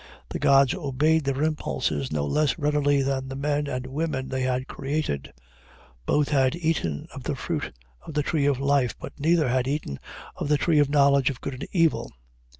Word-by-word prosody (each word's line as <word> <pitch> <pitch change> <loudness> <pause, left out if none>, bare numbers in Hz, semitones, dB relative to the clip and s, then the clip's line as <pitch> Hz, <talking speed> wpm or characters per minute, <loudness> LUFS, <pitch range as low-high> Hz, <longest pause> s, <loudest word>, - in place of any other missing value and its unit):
The - - -4
gods 135 -1 +5
obeyed 155 -1 +1
their 140 +1 0
impulses 75 - -1
not 75 -1 -1
less 150 -1 +2
readily 145 -2 +2
than 135 -1 -1
the 135 - -6
men 145 +1 -1
and 125 -1 -3
women 135 -1 -3
they 130 -1 -2
had 130 +1 -1
created; 135 - -3 0.8
both 150 -1 +2
had 135 -1 +2
eaten 160 - -1
of - - -7
the - - -3
fruit - - -3 0.3
of 160 - -10
the 150 - +2
tree 145 -2 +1
of 140 -3 +1
life, 140 -3 +2
but - - -9
neither 160 0 +3
had 130 +1 +1
eaten 140 - -3 0.4
of - - -3
the 150 - +4
tree 155 +2 +2
of 145 -1 +3
knowledge 140 -2 +4
of 130 -4 -5
good 140 - -5
and 130 - -6
evil. 165 -4 +1
140 Hz, 190 wpm, -25 LUFS, 130-150 Hz, 0.8 s, gods